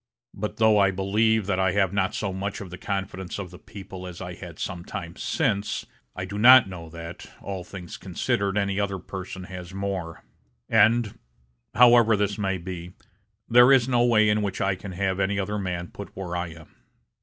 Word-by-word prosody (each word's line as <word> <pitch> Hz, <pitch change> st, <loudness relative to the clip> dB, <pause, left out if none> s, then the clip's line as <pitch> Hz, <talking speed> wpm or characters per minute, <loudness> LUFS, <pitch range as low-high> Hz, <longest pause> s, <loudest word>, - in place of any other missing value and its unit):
But, 105 Hz, +2 st, -5 dB
though 110 Hz, -2 st, +5 dB
I 100 Hz, -1 st, +5 dB
believe 105 Hz, +3 st, +1 dB
that 95 Hz, -1 st, 0 dB
I 95 Hz, -1 st, +2 dB
have 100 Hz, -2 st, +2 dB
not 95 Hz, -2 st, 0 dB
so 100 Hz, -3 st, -2 dB
much 100 Hz, +2 st, -4 dB
of 95 Hz, -4 st, -8 dB
the 90 Hz, -, -7 dB
confidence 95 Hz, -2 st, -4 dB
of 95 Hz, -3 st, -6 dB
the 90 Hz, -, -12 dB
people 95 Hz, -2 st, -9 dB
as 90 Hz, -2 st, -9 dB
I 90 Hz, -1 st, -6 dB
had 85 Hz, -3 st, -10 dB
some 90 Hz, -2 st, -4 dB
time -, -, -7 dB
since, 100 Hz, +1 st, -1 dB, 0.3 s
I 90 Hz, -, -4 dB
do 100 Hz, +2 st, -5 dB
not 125 Hz, 0 st, +9 dB
know 85 Hz, -4 st, -8 dB
that, 85 Hz, +1 st, -9 dB
all 95 Hz, -2 st, -5 dB
things 90 Hz, -1 st, -9 dB
considered 100 Hz, 0 st, -1 dB
any 100 Hz, -1 st, 0 dB
other 100 Hz, -1 st, -1 dB
person 95 Hz, 0 st, -7 dB
has 90 Hz, 0 st, -9 dB
more; 95 Hz, -4 st, -4 dB, 0.4 s
and, 115 Hz, -1 st, +3 dB, 0.6 s
however 120 Hz, -2 st, +6 dB
this 100 Hz, +1 st, -1 dB
may 95 Hz, -2 st, 0 dB
be, 90 Hz, 0 st, -7 dB, 0.5 s
there 120 Hz, +2 st, +7 dB
is 130 Hz, -3 st, +5 dB
no 120 Hz, -2 st, +3 dB
way 110 Hz, -3 st, +4 dB
in 105 Hz, 0 st, +2 dB
which 100 Hz, -2 st, -3 dB
I 95 Hz, 0 st, +1 dB
can 95 Hz, 0 st, -8 dB
have 95 Hz, +1 st, -1 dB
any 100 Hz, +1 st, +1 dB
other 105 Hz, +1 st, -2 dB
man 90 Hz, -3 st, -3 dB
put 100 Hz, -, -10 dB
where 90 Hz, -2 st, -5 dB
I 90 Hz, 0 st, -2 dB
am. 80 Hz, -1 st, -13 dB
95 Hz, 195 wpm, -25 LUFS, 90-105 Hz, 0.6 s, not